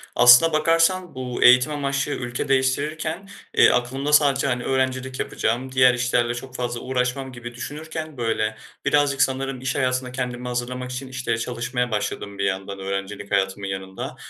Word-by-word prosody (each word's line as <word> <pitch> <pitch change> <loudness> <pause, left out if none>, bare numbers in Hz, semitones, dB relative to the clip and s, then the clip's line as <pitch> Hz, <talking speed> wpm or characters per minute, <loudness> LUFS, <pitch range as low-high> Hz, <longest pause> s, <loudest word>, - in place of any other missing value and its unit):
Aslına 125 +7 +7
bakarsan, 165 +2 +2
bu 125 -1 -3
eğitim 125 +4 +6
amaçlı 140 0 -1
ülke 120 -3 -3
değiştirirken, 155 +7 -1 0.3
eee, - - +8
aklımda 135 +4 -1
sadece, 140 -2 +4
hani, 120 -2 -1
öğrencilik 130 0 -1
yapacağım, 125 +4 -2
diğer 130 -1 +5
işlerle 120 -1 +1
çok 130 +1 -9
fazla 120 -1 -3
uğraşmam 130 +1 -2
gibi 120 0 -9
düşünürken, 155 +3 -7
böyle, 110 -2 -1 0.3
birazcık 145 -2 +2
sanırım 135 -1 0
iş 130 0 -2
hayatına 130 -1 0
kendimi 125 -1 -4
hazırlamak 125 +1 -4
için, 130 +1 -5
işte, 130 -3 -2
çalışmaya 125 +1 -2
başladım 100 -1 -3
bir 100 - -2
yandan 95 0 -2
öğrencilik 100 +1 -5
hayatımın 95 0 0
yanında. 95 0 -6
125 Hz, 150 wpm, -23 LUFS, 120-135 Hz, 0.3 s, eee